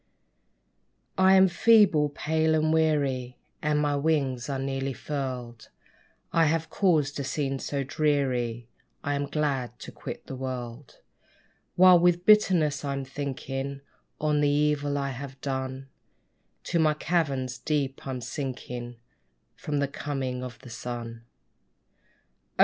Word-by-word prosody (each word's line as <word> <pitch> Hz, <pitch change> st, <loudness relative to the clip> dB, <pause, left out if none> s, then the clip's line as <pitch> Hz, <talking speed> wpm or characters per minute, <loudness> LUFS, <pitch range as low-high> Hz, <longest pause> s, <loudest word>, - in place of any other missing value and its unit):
I 190 Hz, 0 st, +6 dB
am 190 Hz, 0 st, +7 dB
feeble, 185 Hz, -6 st, +5 dB
pale 160 Hz, +2 st, +1 dB
and 155 Hz, 0 st, +2 dB
weary, 140 Hz, -6 st, +1 dB, 0.2 s
And 150 Hz, -1 st, +1 dB
my 145 Hz, -1 st, +1 dB
wings 140 Hz, -5 st, 0 dB
are 135 Hz, -, -1 dB
nearly 135 Hz, 0 st, -2 dB
furled. 125 Hz, -4 st, -5 dB, 0.6 s
I 165 Hz, -1 st, +4 dB
have 160 Hz, +1 st, 0 dB
caused 155 Hz, -8 st, +2 dB
a -, -, -1 dB
scene 135 Hz, 0 st, -2 dB
so 140 Hz, 0 st, -2 dB
dreary, 130 Hz, -5 st, 0 dB, 0.4 s
I 145 Hz, -, -1 dB
am 140 Hz, 0 st, -1 dB
glad 135 Hz, -5 st, -1 dB
to -, -, -9 dB
quit -, -, -8 dB
the 135 Hz, -, -6 dB
world. 125 Hz, 0 st, -6 dB, 0.7 s
While 180 Hz, -1 st, +8 dB
with 175 Hz, 0 st, +3 dB
bitterness 180 Hz, -9 st, +4 dB
I'm 140 Hz, -1 st, -3 dB
thinking 135 Hz, 0 st, -4 dB, 0.4 s
On 150 Hz, -1 st, +1 dB
the 145 Hz, -, +3 dB
evil 145 Hz, 0 st, +1 dB
I 140 Hz, -1 st, -1 dB
have 135 Hz, +1 st, -8 dB
done, 130 Hz, 0 st, -4 dB, 0.8 s
To 170 Hz, -, 0 dB
my 155 Hz, -1 st, +3 dB
caverns 140 Hz, -6 st, -1 dB
deep 140 Hz, -3 st, -2 dB
I'm 130 Hz, -2 st, -4 dB
sinking 125 Hz, -3 st, -5 dB, 0.6 s
From 150 Hz, -1 st, -3 dB
the 140 Hz, 0 st, +1 dB
coming 135 Hz, -3 st, -4 dB
of 125 Hz, -2 st, -7 dB
the 125 Hz, -, -10 dB
sun. 115 Hz, -1 st, -6 dB, 1.3 s
Oh! -, -, -33 dB
140 Hz, 135 wpm, -27 LUFS, 130-155 Hz, 1.3 s, While